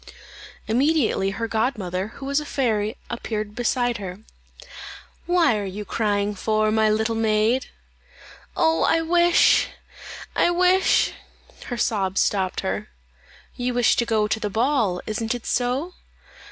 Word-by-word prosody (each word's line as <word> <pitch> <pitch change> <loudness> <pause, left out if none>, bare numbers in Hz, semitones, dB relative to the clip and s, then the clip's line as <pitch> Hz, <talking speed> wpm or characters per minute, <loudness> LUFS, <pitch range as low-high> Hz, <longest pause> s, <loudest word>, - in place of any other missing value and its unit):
Immediately 250 -4 +2
her 225 +4 -3
godmother, 210 -5 -2
who 270 - -8
was 280 +1 +1
a 300 - -6
fairy, 220 -4 -1
appeared 215 -3 -4
beside 245 +1 0
her. 190 0 -7 1.1
"What 345 -9 +3
are 210 - -2
you 205 +2 -6
crying 205 -1 0
for, 215 +1 0
my 220 0 +3
little 220 +1 +1
maid?" 225 +3 +1 0.9
"Oh, 320 0 +2
I 330 - +3
wish 345 +1 +4 0.7
I - - +3
wish 365 +2 +3 0.3
" - - -19
Her 245 - -4
sobs 195 -5 0
stopped 190 -2 0
her. - - -3 0.7
"You 245 0 -2
wish 245 -2 +3
to 235 - +2
go 215 -2 +1
to 220 - -1
the 210 - -2
ball; 225 -5 +1
isn't 225 +2 -2
it 240 - -8
so?" 260 +8 -1
225 Hz, 140 wpm, -23 LUFS, 210-265 Hz, 1.1 s, wish